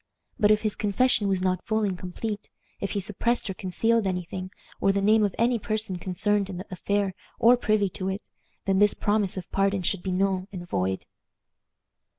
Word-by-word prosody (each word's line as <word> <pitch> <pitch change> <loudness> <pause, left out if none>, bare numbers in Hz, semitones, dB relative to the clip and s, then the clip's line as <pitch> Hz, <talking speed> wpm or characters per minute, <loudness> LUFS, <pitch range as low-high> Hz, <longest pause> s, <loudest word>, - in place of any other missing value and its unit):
But 205 - +5
if 215 0 +4
his 215 -2 +1
confession 210 +1 +2
was 190 -2 +1
not 185 -1 0
full 220 0 0
and 195 -3 0
complete 200 +4 -5 0.3
if 200 - -3
he 205 - 0
suppressed 215 +5 0
or - - -4
concealed 210 +4 +1
any 180 -1 -1
thing, 185 +2 -6 0.3
or 195 - +3
the 200 - 0
name 215 +2 +4
of 200 -3 0
any 235 0 +2
person 215 -3 -2
concerned 200 +2 0
in 185 - -5
the 185 - -6
affair 200 +1 0 0.2
or 240 +2 +6
privy 215 -4 +2
to 185 +1 -4
it, 195 +2 -4 0.4
then 195 -1 +2
this 205 0 +5
promise 205 -2 +1
of 180 - -7
pardon 195 -1 +1
should 185 +1 0
be 190 - -3
null 190 0 0
and 175 -3 -7
void. 95 - -1
195 Hz, 195 wpm, -26 LUFS, 185-210 Hz, 0.4 s, or